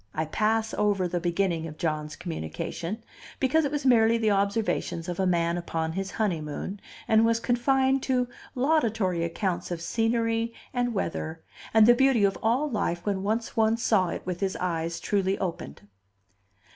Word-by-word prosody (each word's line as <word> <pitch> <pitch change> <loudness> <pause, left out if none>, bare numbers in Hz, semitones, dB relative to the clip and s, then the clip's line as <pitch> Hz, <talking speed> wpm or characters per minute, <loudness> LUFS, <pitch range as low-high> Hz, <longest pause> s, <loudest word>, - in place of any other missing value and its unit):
I 160 - 0
pass 220 +6 0
over 200 -3 +1
the 175 0 -2
beginning 175 -1 0
of 155 -1 -9
John's 155 -2 -2
communication, 170 - -5 0.4
because 290 +4 +3
it 280 - -1
was 295 -2 -2
merely 230 -2 +5
the 220 -2 +2
observations 200 -4 0
of 175 0 -4
a 190 - +2
man 170 -1 +1
upon 160 -2 -2
his 190 +3 -3
honeymoon, 190 -1 -3 0.3
and 220 0 +5
was 230 0 +3
confined 265 +3 +2
to 250 -2 +1 0.3
laudatory 225 - +1
accounts 175 +1 -2
of 175 -2 -3
scenery 230 +4 0 0.2
and 245 -2 0
weather, 165 -3 -3 0.3
and 220 -1 +6
the 240 - +8
beauty 260 -3 +3
of 195 -1 +3
all 245 +7 +2
life 200 -9 -2
when 200 -2 0
once 220 +3 -2
one 225 0 +3
saw 215 -5 +2
it - - -5
with 180 -1 -3
his 195 -1 -1
eyes 165 -2 -2
truly 195 -1 0
opened. 100 - -5
200 Hz, 165 wpm, -27 LUFS, 170-230 Hz, 0.4 s, the